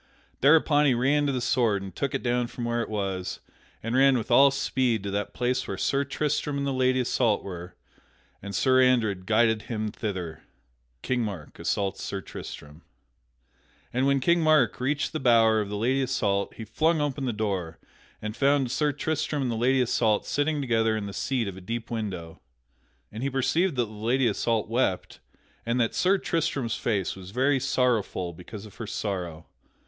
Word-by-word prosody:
Thereupon 150 0 +5
he 130 - +3
ran 145 +4 +2
to - - +1
the 130 -2 -2
sword 115 -5 +1
and 95 - -9
took 140 -2 -2
it - - -3
down 120 0 +1
from 120 0 -6
where 120 0 0
it 115 - -4
was, 95 -3 -3 0.4
and 115 +2 -2
ran 135 0 +5
with 110 - -4
all 140 +1 +7
speed 130 -5 0
to 100 - -3
that 100 +1 -2
place 125 +1 0
where 95 - -4
Sir 140 +8 +1
Tristram 145 +1 -1
and 140 - -1
the 140 - -1
Lady 130 0 +2
Isoult 115 -3 +1
were, 90 -1 -8 0.7
and 100 0 -6
Sir 130 -1 +4
Andred 110 -8 +2
guided 110 0 +3
him 110 -2 -2
thither. 90 -8 -4
[Sidenote: - - -35
King 125 -1 0
Mark 100 -9 -6
assaults 95 -1 -1
Sir 100 - -4
Tristram] 75 -4 -9 1.1
And 130 +3 +1
when 140 0 +3
King 170 +6 +3
Mark 155 -8 +3
reached 145 +5 -1
the 155 - -2
bower 115 -3 +4
of 100 - -4
the 105 - -3
Lady 130 +5 +1
Isoult 100 -6 0
he 110 - -7
flung 160 +8 +1
open 145 -2 -1
the 125 - 0
door 100 -7 -3 0.5
and 105 0 -4
found 140 -2 +2
Sir 150 +2 +1
Tristram 150 0 -2
and 125 - -1
the - - -2
Lady 130 +3 +2
Isoult 115 -3 +1
sitting 145 +1 0
together 115 -4 +1
in 105 - -4
the 100 - -6
seat 125 -2 -1
of 95 - -5
a - - -9
deep 115 +5 -5
window. 95 -8 -5 0.7
And 110 - -7
he 135 - 0
perceived 140 +6 +1
that 120 -2 +1
the 110 - -13
Lady 115 +5 0
Isoult 115 +1 0
wept 115 -5 -1 0.4
and 115 +2 -1
that 115 -2 +1
Sir 190 +2 +3
Tristram's 155 - -1
face 105 -4 -1
was 95 -1 -10
very 135 +6 +2
sorrowful 120 -9 0
because 100 +5 -10
of 105 - -14
her 115 - -6
sorrow. 90 -7 -4
120 Hz, 190 wpm, -26 LUFS, 100-135 Hz, 1.1 s, all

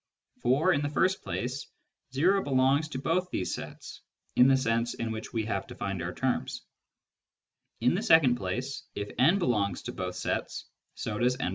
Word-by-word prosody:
For, 145 +9 +3
in 145 - +1
the 145 - -1
first 185 +6 +1
place, 125 +3 -4 0.5
o 190 +7 +4
belongs 135 +1 +2
to 135 - -4
both 180 +7 0
these 90 - -2
sets - - -8 0.3
(in 125 - +7
the 135 0 +5
sense 115 -2 0
in 115 -1 -3
which 110 0 -6
we 110 -2 -1
have 100 -3 -2
defined 95 -3 -4
our 85 +1 -3
terms); 130 +6 -2 1.2
in 125 - +4
the 185 - 0
second 160 - +6
place, 125 +6 -3
if 100 0 -4
n 160 +10 +5
belongs 105 - 0
to - - -4
both 90 -1 -4
sets, - - -3 0.3
so 105 -1 -4
does 125 +1 +2
n+i. - - 0
130 Hz, 175 wpm, -29 LUFS, 110-150 Hz, 1.2 s, in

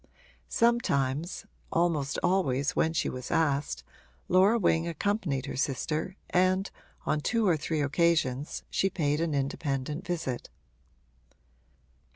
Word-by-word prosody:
Sometimes 170 - +1 0.3
(almost 160 -5 +1
always 145 -7 +1
when 160 - +2
she 165 +2 0
was 130 0 -5
asked) 140 - 0 0.5
Laura 190 +5 +5
Wing 170 -5 +2
accompanied 170 - -1
her - - -5
sister 150 +6 -1 0.2
and 185 +2 +2 0.3
on 150 - +1
two 230 +5 +1
or 175 - +4
three 155 0 -2
occasions 145 -2 +1
she 195 - +2
paid 150 -4 0
an 165 -3 0
independent 140 +2 -2
visit. 165 -9 -3
160 Hz, 115 wpm, -29 LUFS, 140-180 Hz, 0.5 s, Laura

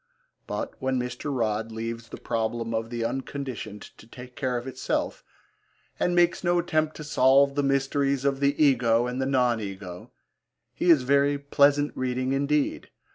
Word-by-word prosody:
But - - -4
when 130 0 0
Mr. 125 +3 -4
Rodd 110 -3 -1
leaves 115 +1 -5
the - - -8
problem 115 0 -2
of 115 0 -2
the 120 -1 -3
Unconditioned 130 -4 -5 0.2
to 110 - -15
take 125 +1 -12
care 130 -3 -1
of 120 - -5
itself, 130 -1 -3 0.8
and 180 - +1
makes 175 0 +3
no 175 0 +2
attempt 155 -3 0
to 155 - -7
solve 140 -1 +4
the 145 - 0
mysteries 140 0 0
of 135 -1 +1
the 140 0 +1
Ego 120 -5 +4
and 125 +2 -3
the 130 - 0
non 125 -4 +2
Ego, 95 -3 -7 0.6
he 175 - 0
is 155 -6 +6
very 140 +2 +3
pleasant 140 +1 +2
reading 130 +1 -1
indeed. 140 +1 0
130 Hz, 165 wpm, -26 LUFS, 115-140 Hz, 0.8 s, is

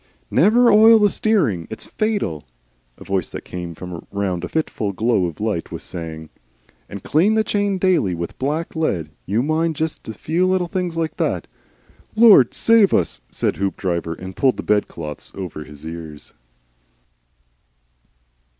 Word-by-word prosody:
"Never 235 +3 +5
oil 220 +2 +8
the 205 -2 +3
steering. 145 - +1
It's 110 - -6
fatal," 205 - -2 0.5
a - - -12
voice 95 -3 -1
that - - -8
came 85 -2 -6
from 90 0 -8
round 95 -3 -2
a - - -2
fitful 110 -10 -2
glow 110 -2 +1
of 85 - -8
light, 105 -6 -2
was - - -6
saying. 80 +4 -7 0.6
"And 100 -2 -8
clean 190 +9 +3
the 220 - +3
chain 205 -2 0
daily 180 - +2
with 85 0 -6
black 150 +6 -2
lead. 90 - -1 0.2
You 110 +6 +1
mind 160 +2 0
just 160 +1 -3
a 110 - -6
few 170 - 0
little 185 -1 +1
things 175 -1 -3
like 160 -1 -2
that - - -1 0.4
" - - -36 0.3
"Lord 215 - +7
LOVE 225 -4 +6
us!" 85 - 0
said - - -2
Hoopdriver, 90 -4 -2
and 95 +2 -9
pulled 130 -2 +2
the - - -5
bedclothes 85 -8 -2
over 85 -5 -6
his 75 0 -12
ears. 80 -2 -7
110 Hz, 160 wpm, -21 LUFS, -, 0.6 s, oil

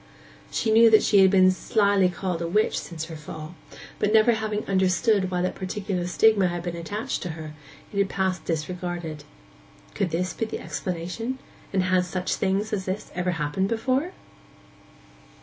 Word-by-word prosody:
She 220 - 0
knew 225 +1 +7
that 220 -1 +6
she 205 - +4
had 190 0 +7
been 185 -1 +5
slily 200 0 +2
called 180 -1 -3
a 170 - -1
witch 210 +6 +1
since 160 -2 -6
her 165 0 -8
fall; 155 +1 -8 0.5
but 210 - +1
never 220 +2 +6
having 215 -1 -2
understood 190 +1 +2
why 180 -1 -1
that 185 - 0
particular 190 -1 -3
stigma 200 +1 +4
had 175 -1 -3
been 175 -1 -4
attached 205 +10 -4
to 180 - -4
her, 155 -1 -7 0.4
it 200 - -1
had 200 -1 +2
passed 190 -1 -1
disregarded. 165 -2 -4 0.7
Could 195 -3 -1
this 180 +3 -1
be 225 - -2
the 220 - -5
explanation, 185 +8 -4 0.3
and 190 -2 +1
had 185 0 +2
such 180 +1 -2
things 200 +2 -1
as 190 -3 -2
this 190 +3 -4
ever 180 0 -1
happened 155 +5 -1
before? 260 +9 0
185 Hz, 170 wpm, -25 LUFS, 175-210 Hz, 0.7 s, knew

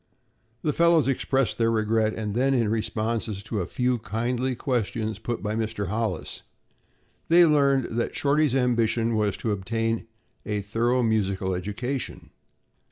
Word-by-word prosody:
The 150 - +1
fellows 170 -4 +4
expressed 135 -1 0
their 115 0 +3
regret 110 0 +1
and 105 -2 -3
then 135 +4 +2
in 115 -4 +2
responses 110 -1 -2
to 110 -2 -3
a 85 - -3
few 125 +2 0
kindly 120 +4 -1
questions 115 -4 -2
put 120 0 -4
by 105 0 -1
Mr. 110 -4 -2
Hollis, 110 +2 -2 0.9
they 170 +1 +7
learned 140 -4 +3
that 120 - -1
Shorty's 145 -1 +2
ambition 115 -2 +1
was 105 -2 0
to 110 - -2
obtain 115 +3 -1 0.4
a 105 -1 -2
thorough 120 +5 +1
musical 100 -4 0
education. 110 +8 -4
115 Hz, 140 wpm, -25 LUFS, 110-125 Hz, 0.9 s, they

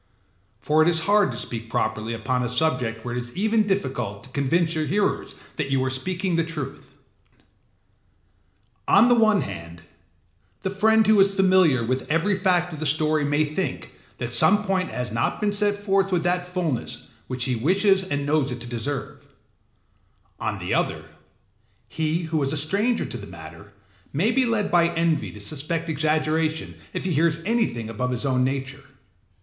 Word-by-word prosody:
For 155 +1 +2
it 155 - +4
is 165 -2 +2
hard 205 +3 +3
to - - -6
speak 115 -1 -6
properly 110 +1 -2
upon 125 +2 -1
a 120 - -1
subject 125 -4 -1
where 120 0 -3
it 125 - -1
is 120 0 -10
even 215 +1 +2
difficult 120 - -2
to - - -12
convince 160 +5 +1
your 155 -2 -1
hearers 200 +7 -1 0.2
that 150 -4 -2
you 135 -1 +1
are 130 - -1
speaking 180 +7 -1
the 165 - +2
truth. 160 -5 -7 1.9
On 230 +5 +6
the - - +6
one 215 -4 +4
hand, 85 -3 -8 0.8
the 190 - -1
friend 220 +3 +3
who 215 0 +5
is 195 0 +4
familiar 185 -10 +4
with 130 +2 -2
every 165 +6 +2
fact 180 -2 +1
of 155 - -7
the 155 - -1
story 155 +1 +1
may 145 +2 +2
think 155 +6 -4 0.2
that - - -4
some 210 0 +5
point 190 -2 0
has 125 -3 -4
not 115 - -1
been 210 -1 0
set 205 0 +1
forth 195 -1 +1
with 175 -3 +1
that 180 0 0
fullness 175 -8 -3 0.2
which 125 -1 -3
he 130 -2 0
wishes 190 - +2
and 145 -6 -2
knows 145 -2 +1
it 125 - -5
to 120 - -5
deserve; 125 +3 -4 1.1
on - - -2
the - - -3
other, - - -1 0.8
he 160 +2 -1
who 160 -1 -1
is 135 0 0
a 155 - -1
stranger 200 +11 +1
to - - -6
the 100 -3 -9
matter 80 +4 -12 0.4
may 185 +11 +2
be 255 +1 +2
led 220 -3 0
by 170 -1 +5
envy 165 -2 +1
to 105 - -11
suspect 155 +9 -4
exaggeration 155 - 0 0.2
if - - -4
he 185 - 0
hears 165 +2 +1
anything 220 - 0
above 115 +3 -3
his 125 +2 -2
own 130 -2 +2
nature. 135 +1 -3
155 Hz, 180 wpm, -24 LUFS, 130-190 Hz, 1.9 s, On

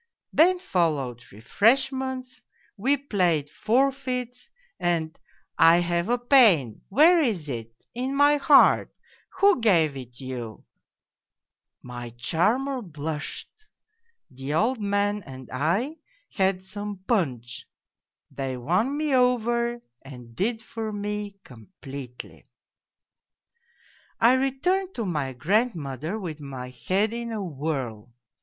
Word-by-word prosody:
Then 360 +4 +5
followed 150 - -1
refreshments, 255 - 0 0.3
we 260 +7 +1
played 180 - 0
forfeits, 250 +1 -1 0.3
and 165 -2 -1 0.3
' - - -48
I 165 +1 +7
have 175 +2 0
a 245 - +3
pain 225 - +4
' - - -41
' - - -47
Where 325 - +6
is 205 - -1
it? 115 -3 -5
' - - -38
' - - -62
In 270 +2 -2
my 290 +1 +5
heart 285 0 +5 0.2
' - - -29
' - - -47
Who 395 -7 +4
gave 165 -10 +3
it 125 -2 -9
you? 125 -5 -7 0.6
' - - -58
My 120 -1 -6
charmer 235 - 0
blushed. 155 -5 -6 0.8
The 135 +3 -4
old 230 +7 +1
man 205 +1 0
and 130 -6 -11
I 190 - 0 0.3
had 190 -1 0
some 205 +1 -6
punch 125 - -2 0.6
they 135 -2 -4
won 185 - 0
me 305 -2 0
over 240 -1 +1 0.2
and 125 -4 -12
did 225 - -1
for 220 -1 -5
me 205 -1 -4
completely. 135 - -11 0.9
" 470 - -35
I 235 +2 +6
returned 345 +9 0
to 230 - -3
my 150 -7 -2
grandmother 160 - -1
with 165 -7 -6
my 130 -3 -7
head 190 - 0
in 235 0 -4
a 215 -3 -3
whirl. 135 - -4
195 Hz, 130 wpm, -25 LUFS, -, 0.9 s, I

